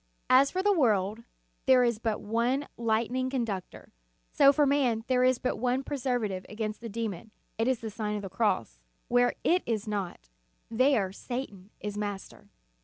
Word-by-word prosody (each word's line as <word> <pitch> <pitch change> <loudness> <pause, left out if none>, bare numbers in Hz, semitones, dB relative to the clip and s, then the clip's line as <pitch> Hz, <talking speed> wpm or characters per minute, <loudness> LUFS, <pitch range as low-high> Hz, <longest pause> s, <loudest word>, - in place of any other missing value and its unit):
As 265 +2 +6
for 375 +1 -2
the 410 0 +4
world 215 - +1 0.5
there 255 -1 +6
is 235 -3 +1
but 225 -2 -1
one 235 +6 0
lightning 235 +3 0
con 260 -3 -1
ductor, 195 -5 -7 0.4
so 275 - +6
for 295 +1 +3
man 260 -6 +2
there 255 -1 +3
is 255 0 +4
but 255 - -2
one 250 +2 0
preserva 250 -5 -1
tive 190 -2 -5
against 215 0 -4
the 230 - -6
demon, 220 -2 -4 0.3
it 225 - +2
is 260 -3 +1
the 220 -1 -5
Sign 210 0 -3
of 205 - -6
o - - -5
o - - -3
the - - -24
Cross. 185 - 0 0.3
Where 245 0 +3
it 360 +2 +3
is 220 -2 -1
not, 185 - -4 0.4
there 230 -5 +2
Satan 205 -3 -6
is 210 0 -5
master. 205 0 -6
230 Hz, 185 wpm, -29 LUFS, 210-255 Hz, 0.5 s, As